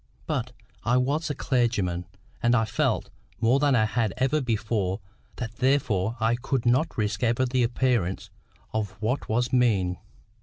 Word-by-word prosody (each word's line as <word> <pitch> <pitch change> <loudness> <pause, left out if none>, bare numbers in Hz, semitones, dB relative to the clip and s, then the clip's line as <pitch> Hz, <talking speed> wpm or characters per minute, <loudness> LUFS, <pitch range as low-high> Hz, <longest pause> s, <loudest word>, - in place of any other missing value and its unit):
But - - -2 0.3
I 125 +2 +3
was 145 +6 0
a 145 - -2
clergyman; 105 - 0 0.3
and 120 0 +3
I 110 -2 +3
felt, - - 0 0.3
more 120 +4 +3
than 140 -2 +3
I 110 -2 +4
had 110 -2 0
ever 135 +4 +2
felt 145 - -2
before, 105 -4 -1 0.4
that 115 -1 -6
therefore 125 -5 +1
I 110 +1 +2
could 125 0 -2
not 130 +7 +2
risk 105 -2 -1
ever 120 +2 +2
the 125 0 +1
appearance 120 -6 0 0.4
of 110 -3 -2
what 120 +6 -1
was 120 +3 0
mean. 100 -8 +2
120 Hz, 160 wpm, -26 LUFS, 110-130 Hz, 0.4 s, I